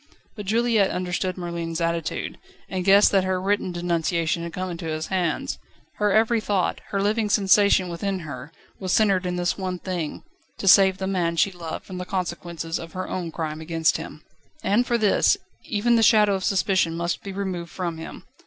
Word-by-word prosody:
But 210 -3 -7
Juliette 225 -2 +3
understood 180 0 -2
Merlin's 170 -2 -4
attitude, 170 -1 -2 0.3
and 185 -1 -3
guessed 200 +2 +6
that 195 -2 +3
her 185 0 0
written 195 0 0
denunciation 170 -1 0
had 170 0 -5
come 185 +1 -4
into 170 -1 -6
his 155 0 -2
hands. 180 -4 -1 0.4
Her 210 -1 +2
every 225 +2 +3
thought, 200 -4 0
every 195 -1 -1
living 210 +1 +1
sensation 200 -2 +4
within 185 +2 -3
her, 140 -2 -8 0.3
was 185 -2 -3
centred 195 -4 +3
in 180 - -2
this 180 +2 -1
one 185 -1 -2
thing: 175 -4 -4 0.3
to 195 - -4
save 190 0 +7
the 190 - -3
man 180 -3 0
she 180 +4 +2
loved 170 -3 -7
from 185 -1 -7
the 180 - -4
consequences 175 -3 -3
of 165 -1 -9
her 185 0 -4
own 175 -2 -3
crime 155 -1 -4
against 165 0 +1
him. - - -9 0.4
And 235 +5 +2
for 240 - +2
this, 220 - +3 0.3
even 235 +3 +2
the - - +3
shadow 210 -2 +5
of 190 -1 -2
suspicion 185 -4 +1
must 170 0 -2
be 195 - -7
removed 190 -3 -4
from 170 -3 -4
him. 160 - -9
185 Hz, 190 wpm, -24 LUFS, 170-200 Hz, 0.4 s, save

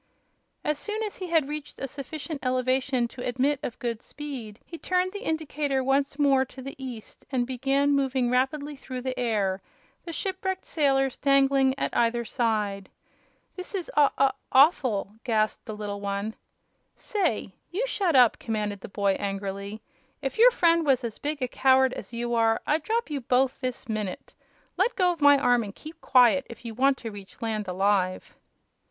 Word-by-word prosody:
As 300 -1 -1
soon 430 +4 -3
as 420 - -5
he 370 - -5
had 325 -5 +2
reached 300 0 -6
a 270 - -4
sufficient 290 +2 -7
elevation 255 0 +1
to 245 - -8
admit 265 +3 +1
of 245 - -5
good 235 -4 -3
speed 255 -8 -8
he 335 - -9
turned 365 0 0
the 410 - -6
indicator 300 - -1
once 275 +1 +1
more 275 -3 +4
to 265 0 -12
the 275 - -6
east 240 -4 -8
and 250 -3 +1
began 270 +3 +1
moving 265 -3 +1
rapidly 285 +3 0
through 260 -2 -7
the 255 0 -3
air, 205 -5 0 0.4
the 340 - -6
shipwrecked 380 +2 -3
sailors 270 -4 +1
dangling 275 -1 +3
at - - -2
either 235 0 +2
side. 210 -5 -1 0.7
"This 365 +2 -7
is 365 -3 -4
aw 290 -2 +6
aw 275 -1 +4 0.2
awful!" 255 - +3
gasped 215 -3 0
the 215 -3 -6
little 205 -1 -5
one. 200 +2 -2 0.6
"Say, 340 - -1 0.2
you 400 +9 -1
shut 380 - 0
up!" 245 -3 +6
commanded 210 -3 -3
the - - -8
boy, 200 0 +1
angrily. 200 +1 -4 0.4
"If 270 +7 -4
your 485 +2 +9
friend 335 -7 +3
was 270 -5 +2
as 230 -2 -5
big 295 -2 -3
a - - +1
coward 260 0 +3
as - - -8
you 240 0 -3
are 225 -1 +3
I'd 310 +2 +1
drop 450 +1 -1
you 285 -2 -2
both 255 +2 +1
this 255 -2 -4
minute. 215 -4 -4 0.4
Let 430 +7 +2
go 360 -3 +2
my 285 -1 +7
arm 245 -3 +3
and 205 -2 -7
keep 310 +2 -11
quiet, 255 +1 +4
if 235 0 -11
you 230 - -5
want 265 +3 +3
to 225 -2 -6
reach 200 -2 -12
land 215 -2 -2
alive." 185 0 0
260 Hz, 175 wpm, -26 LUFS, 225-295 Hz, 0.7 s, your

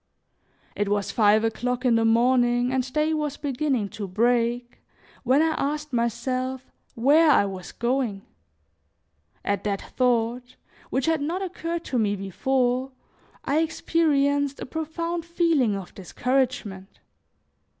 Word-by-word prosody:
It 205 -1 -1
was 205 -1 0
five 215 0 +4
o'clock 245 +3 -2
in 245 - +4
the 225 0 +3
morning 245 +1 +3
and 260 -1 -1
day 305 +2 +1
was 300 -2 -2
beginning 270 -6 -1
to 205 0 -6
break, 240 +4 0 0.4
when 265 +5 +3
I 325 - +2
asked 300 -1 -2
myself 255 +2 -2 0.2
where 295 +7 +5
I 270 - +5
was 190 -2 -7
going. 235 -5 -1 1.2
At 200 -1 -1
that 200 -1 -1
thought, 245 0 0 0.3
which 260 0 0
had 325 -2 +1
not 340 +6 -2
occurred 340 -2 -4
to 255 - -2
me 205 -2 +1
before, 250 +6 -1 0.5
I 290 +3 +2
experienced 285 -3 +1
a - - -5
profound 335 +3 -4
feeling 330 - +1
of 195 -2 -7
discouragement. 210 -2 -2
255 Hz, 130 wpm, -25 LUFS, 225-295 Hz, 1.2 s, where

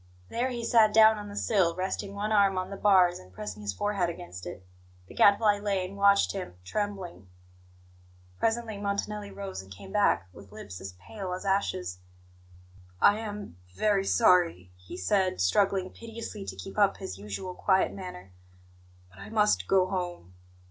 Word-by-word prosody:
There 245 +3 -1
he 240 -2 -4
sat 220 -3 +4
down 220 -1 +7
on 205 0 -8
the 205 - -9
sill, 190 -6 +2
resting 190 +2 -3
one 210 +2 -2
arm 200 -3 +4
on 185 +1 -3
the - - -4
bars, 185 -3 +4
and 90 0 -16
pressing 105 +2 -7
his 100 -1 -2
forehead 185 - -1
against 90 - -8
it. 90 +1 -9 0.4
The - - -14
Gadfly 205 0 +4
lay 200 -3 -1
and 190 +2 -9
watched 200 0 +4
him, 185 - -6
trembling. 190 - -4 1.1
Presently 225 -2 -1
Montanelli 205 +1 -3
rose 195 - -6
and 95 0 -16
came 100 - -11
back, 200 - +2
with 100 +1 -14
lips 90 -3 -9
as 95 -1 -7
pale 185 - -7
as 185 - -6
ashes. 90 - -1 1.0
"I 205 +1 +5
am 210 - -7 0.2
very 205 - +2
sorry," 175 - +3
he 90 0 -10
said, 185 - +1
struggling 190 - +2
piteously 225 -3 -8
to - - -6
keep 195 +2 -7
up 200 -1 +4
his 95 - -7
usual 105 - -6
quiet 190 +1 +2
manner, 180 - -9 0.8
"but 95 - -17
I 100 +1 -9
must 95 -4 +2
go 190 -1 +4
home. 175 - -4
190 Hz, 170 wpm, -28 LUFS, -, 1.1 s, down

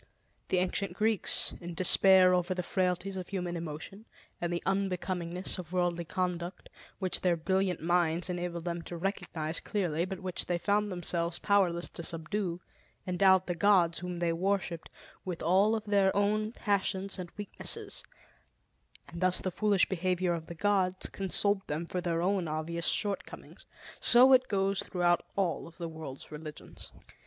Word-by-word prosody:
The 185 - +1
ancient 185 +1 0
Greeks, 215 +2 +2
in 175 -1 -7
despair 185 +1 +5
over 180 +1 +1
the 180 - -2
frailties 185 +1 -1
of 185 -1 -6
human 180 -3 -3
emotion 170 +6 -7 0.3
and 175 0 -1
the 170 - -2
unbecomingness 185 -2 -1
of 175 -2 -8
worldly 175 -1 0
conduct, 180 0 -3 0.3
which 185 -2 -1
their 175 -2 +2
brilliant 190 +1 0
minds 170 0 +2
enabled 175 -1 -3
them 170 -1 -2
to 170 +1 -6
recognize 170 -4 -2
clearly 175 -5 -1
but 190 -1 -6
which 185 -2 -2
they 175 - +1
found 205 +3 +1
themselves 170 -1 -1
powerless 180 -4 +2
to - - -7
subdue, 170 +2 -2 0.4
endowed 190 +1 +4
the 175 - -1
gods, 175 -2 +3
whom 180 0 -5
they 170 -1 0
worshipped, 180 -2 -1 0.3
with 180 -3 -5
all 195 +6 +4
of 220 -1 -4
their 200 -2 +3
own 215 +2 +1
passions 195 -3 -1
and 180 -1 -5
weaknesses, 205 -1 -5 1.1
and 170 +1 -8
thus 185 0 +2
the 185 - -3
foolish 205 0 +2
behavior 185 -1 0
of 165 -1 -5
the 170 - -7
gods 190 0 +1
consoled 195 +1 0
them 155 +3 -3
for 180 +2 -3
their 170 -1 -1
own 190 -2 +1
obvious 160 +2 -1
shortcomings. 205 -2 -2 0.3
So 255 +2 +7
it 255 0 +5
goes 195 -1 +1
throughout 175 -2 +1
all 190 -4 -1
of 170 - -15
the 170 -2 -4
world's 160 -5 -9
religions. 150 0 -9
180 Hz, 160 wpm, -30 LUFS, 170-195 Hz, 1.1 s, So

